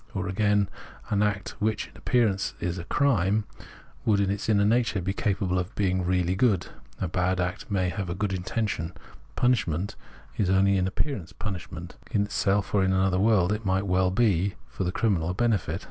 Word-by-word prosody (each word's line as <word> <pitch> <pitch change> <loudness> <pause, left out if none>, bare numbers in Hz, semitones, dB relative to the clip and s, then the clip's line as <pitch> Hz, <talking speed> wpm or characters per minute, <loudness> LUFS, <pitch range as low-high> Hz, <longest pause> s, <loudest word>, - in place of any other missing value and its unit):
Or 95 -1 -2
again, 100 +1 +2 0.4
an 105 -1 +2
act 105 -2 0
which 110 0 0
m - - -22
appearance 110 -6 +1
is 90 +1 -2
a 85 - -6
crime 105 -7 +2 0.6
would 105 -2 +3
m 100 -1 +2
its 100 +2 -3
inner 100 -2 +4
nature 115 -1 +2
be 95 +2 -2
capable 95 -2 0
of 90 +4 -5
being 95 -2 +1
really 90 0 +1
good 100 -3 +2 0.2
— - - -27
a 95 - -1
bad 90 +2 0
act 90 +3 -3
may 95 -3 +1
have 95 -1 -4
a 85 - -2
good 100 0 -1
intention; 90 -2 -2 0.4
punishment 100 -7 +1 0.4
is 100 -4 +1
only 95 +1 +4
in 95 0 +1
appearance 95 - -3
punishment; 85 -3 -6
in 105 -4 +2
itself 100 0 0
or 100 -2 +4
in 95 0 +2
another 95 -1 +2
world 100 -3 +3
it 105 +2 -4
might 95 0 +1
well 95 -1 +2
be, 100 -2 +2
for - - -5
the 90 - 0
criminal, 95 -7 +1
a - - -1
benefit. 100 -8 0
95 Hz, 190 wpm, -27 LUFS, 90-105 Hz, 0.6 s, inner